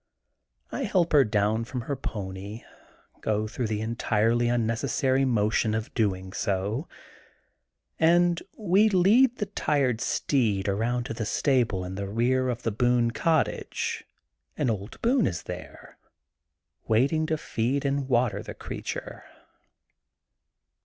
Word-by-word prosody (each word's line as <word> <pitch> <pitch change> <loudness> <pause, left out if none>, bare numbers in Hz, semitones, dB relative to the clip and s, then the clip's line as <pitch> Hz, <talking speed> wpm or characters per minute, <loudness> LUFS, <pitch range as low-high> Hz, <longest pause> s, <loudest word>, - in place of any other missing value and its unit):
I 275 - -2
help 180 -5 +1
her 145 -2 +7
down 110 0 +1
from 125 +2 -5
her 140 +5 -3
pony, 100 -2 -6 0.6
go 110 0 -1
through 120 +2 -3
the 110 0 -2
en 115 +1 -3
tirely 115 +2 +2
unnecessary 120 +3 +1
motion 110 -2 +1
of 110 0 -4
doing 95 -5 -1
so, 105 - -1 1.1
and 175 +1 +4 0.2
we 210 +1 +4
lead 220 +7 +4
the 210 - -1
tired 140 - 0
steed 110 -8 0
around 115 +5 0
to 120 - -5
the 115 - -4
stable 115 -8 +1
in 90 - -6
the 100 0 -4
rear 125 +4 +1
6f 125 -1 -2
the 115 - 0
Boone 120 +1 +2
cottage 160 +3 -1 0.5
and 120 - +1
old 105 +1 -6
Boone 240 0 +3
is 85 - -3
there, - - -9 0.9
waiting 140 +8 +2
to 155 - 0
feed 135 +2 -1
and 140 -1 -1
water 120 -2 +2
the - - -8
creature. - - -6
120 Hz, 130 wpm, -27 LUFS, 110-140 Hz, 1.1 s, her